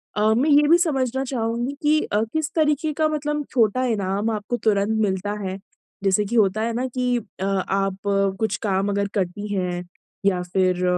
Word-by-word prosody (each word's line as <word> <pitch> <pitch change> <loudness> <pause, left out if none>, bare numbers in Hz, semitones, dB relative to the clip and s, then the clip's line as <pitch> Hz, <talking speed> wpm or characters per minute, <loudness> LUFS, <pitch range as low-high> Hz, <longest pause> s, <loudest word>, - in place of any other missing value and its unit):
अ, 215 +1 +3
मैं 260 +7 +2
ये 295 0 +5
भी 335 +3 +7
समझना 265 -6 0
चाहूँगी 240 0 -2
कि 305 +1 +3
अ, 210 - 0
किस 315 0 -1
तरीके 305 -1 +2
का 310 +1 +2
मतलब 295 -1 -2
छोटा 235 0 +2
इनाम 205 -2 0
आपको 215 +3 -2
तुरंत 215 -1 +1
मिलता 200 0 -1
है? 190 0 -3 0.5
जैसे 195 +1 +2
कि 225 +4 -3
होता 215 -1 +3
है 230 +1 -1
ना 250 +3 -1
कि 250 -1 0
अ, 200 -3 -8
आप 195 0 0 0.4
कुछ 220 -3 0
काम 195 +1 +1
अगर 200 0 0
करती 200 +1 -2
हैं, 180 -2 -2 0.4
या 185 -2 +2
फिर 185 0 0
220 Hz, 180 wpm, -23 LUFS, 195-260 Hz, 0.5 s, भी